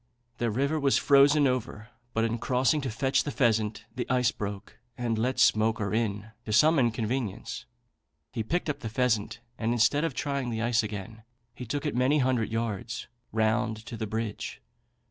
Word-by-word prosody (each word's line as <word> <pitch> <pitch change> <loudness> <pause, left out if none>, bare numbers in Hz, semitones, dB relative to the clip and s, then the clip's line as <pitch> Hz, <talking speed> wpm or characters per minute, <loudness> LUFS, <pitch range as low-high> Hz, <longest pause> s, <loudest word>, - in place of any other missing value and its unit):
The 120 0 +1
river 140 +8 0
was 140 -2 +3
frozen 145 +1 +5
over; 120 -4 -2 0.3
but 115 - +2
in 115 +1 -1
crossing 130 +5 +2
to 135 - -3
fetch 130 +4 +1
the - - -3
pheasant 110 -5 +1
the 125 - -4
ice 125 -1 +3
broke, 100 -1 -6 0.2
and 120 -2 -1
let 125 +3 0
Smoaker 110 -4 +3
in, 110 -1 -1
to 110 - -5
some 155 +8 +5
inconvenience. 115 -2 -2 0.6
He 115 - -2
picked 165 +12 -1
up 145 -1 -2
the 115 - -5
pheasant, 115 -1 0 0.2
and 115 +1 +1
instead 120 +6 +3
of 165 -6 -1
trying 140 -1 -2
the 110 -1 -2
ice 120 -1 +3
again, 110 0 -6 0.3
he 125 0 -8
took 145 +5 -3
it 150 - -1
many 130 +4 +3
hundred 130 -5 +1
yards 115 0 -3 0.3
round 110 0 0
to 120 - -7
the 110 -1 -4
bridge. 110 0 -4
115 Hz, 175 wpm, -28 LUFS, 110-130 Hz, 0.6 s, frozen